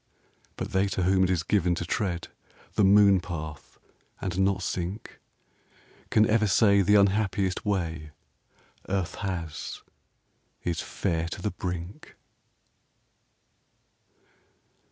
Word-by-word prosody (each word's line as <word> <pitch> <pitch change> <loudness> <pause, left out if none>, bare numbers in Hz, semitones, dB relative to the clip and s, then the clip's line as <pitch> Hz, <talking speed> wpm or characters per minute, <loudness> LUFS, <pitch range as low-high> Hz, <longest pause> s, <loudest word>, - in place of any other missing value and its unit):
But - - -4
they 95 +1 +2
to 95 -1 -2
whom 95 +1 +3
it - - -1
is 90 -4 +1
given 90 -2 +1
to 85 - -4
tread 85 -1 -2 0.4
The 105 - +2
moon 100 0 +6
path 80 -4 -7 0.4
and 95 -1 -3
not 95 -1 +1
sink 90 +4 -4 0.9
Can 110 0 +4
ever 110 -1 +3
say 100 0 +4
the 105 +2 +4
unhappiest 100 -1 +2
way 80 -6 -2 0.8
Earth 95 -2 -1
has 85 -7 -5 0.8
is 85 -2 -1
fair 85 -4 -2
to 85 - -6
the 105 - 0
brink. 90 +1 -6
95 Hz, 115 wpm, -27 LUFS, 85-100 Hz, 0.9 s, moon